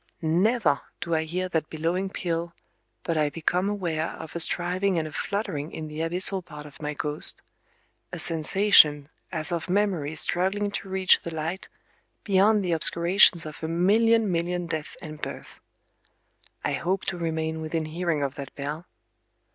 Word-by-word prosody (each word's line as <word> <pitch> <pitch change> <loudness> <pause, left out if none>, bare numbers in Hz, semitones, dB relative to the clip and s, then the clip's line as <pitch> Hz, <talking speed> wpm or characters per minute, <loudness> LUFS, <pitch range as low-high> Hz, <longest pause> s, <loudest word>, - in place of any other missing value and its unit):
Never 170 - +2 0.2
do 170 - -3
I 160 0 +1
hear 180 +3 -3
that 160 -3 -2
billowing 170 +5 -2
peal 170 -2 -4 0.5
but 165 -2 -2
I 150 -1 +2
become 180 +5 -1
aware 170 -6 -2
of 160 0 -9
a - - -2
striving 180 +3 0
and 160 -1 -1
a - - -9
fluttering 160 -4 -4
in 155 -1 -7
the 150 +1 -7
abyssal 180 +3 +3
part 150 -3 -11
of 145 0 -14
my 150 0 -4
ghost,—a 150 +1 -3
sensation 155 -3 +5 0.2
as 160 -3 +3
of 170 0 -3
memories 180 -7 0
struggling 200 +3 0
to 200 - -5
reach 190 -1 +3
the 170 -1 -7
light 160 +4 -4 0.5
beyond 205 +1 +3
the 175 - -1
obscurations 170 +1 +4
of 155 -1 -9
a - - -1
million 210 +5 +3
million 175 +1 -1
deaths 160 -2 -5
and 155 -1 -9
births. - - -8 1.1
I - - 0
hope 190 +2 -2
to 180 - -3
remain 160 -1 -3
within 160 0 -3
hearing 160 -1 -2
of 135 -1 -2
that 140 -2 -9
bell... 150 +4 -6
170 Hz, 160 wpm, -25 LUFS, 155-185 Hz, 1.1 s, sensation